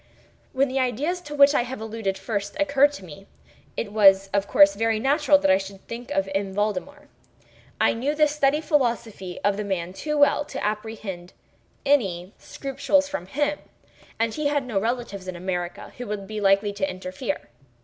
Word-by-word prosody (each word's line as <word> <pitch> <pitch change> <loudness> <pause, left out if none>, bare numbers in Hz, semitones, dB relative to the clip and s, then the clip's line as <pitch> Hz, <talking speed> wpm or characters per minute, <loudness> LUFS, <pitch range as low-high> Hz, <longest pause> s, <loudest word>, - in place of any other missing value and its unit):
When 275 +1 +2
the 265 +1 -1
ideas 275 +9 -1
to 295 -3 -8
which 280 0 +6
I - - +3
have 250 +1 -5
alluded 220 -3 -3
first 200 +3 -4
occurred 285 -1 +4
to 195 - -9
me, 180 +4 -12 0.5
it 205 - -3
was 195 -2 +5
of 200 0 +1
course 295 0 +6
very 225 0 0
natural 290 +3 +4
that 290 -5 +2
I 190 - +4
should 195 0 -9
think 235 +1 -7
of 195 0 0
M. 195 -1 -2
Valdemar. 215 +9 -2 0.7
I - - +4
knew 270 +6 -1
the 305 0 +4
steady 295 0 +1
philosophy 235 - -1
of 205 0 +2
the 210 - -2
man 185 -3 -3
too 300 +9 -3
well 290 0 +4
to 275 -2 -5
apprehend 210 -4 -5 0.5
any 195 -10 +1
scruples 280 +1 0
from 285 -11 -5
him; 290 +7 -1 0.6
and 230 -1 0
he 305 -1 -1
had 285 -2 0
no 225 -6 -1
relatives 220 -4 -3
in 185 - -5
America 175 0 -4
who 245 - -5
would 205 -1 -4
be 215 +1 -5
likely 200 +1 +3
to 195 -1 -1
interfere. 185 - -5
220 Hz, 180 wpm, -24 LUFS, 195-285 Hz, 0.7 s, which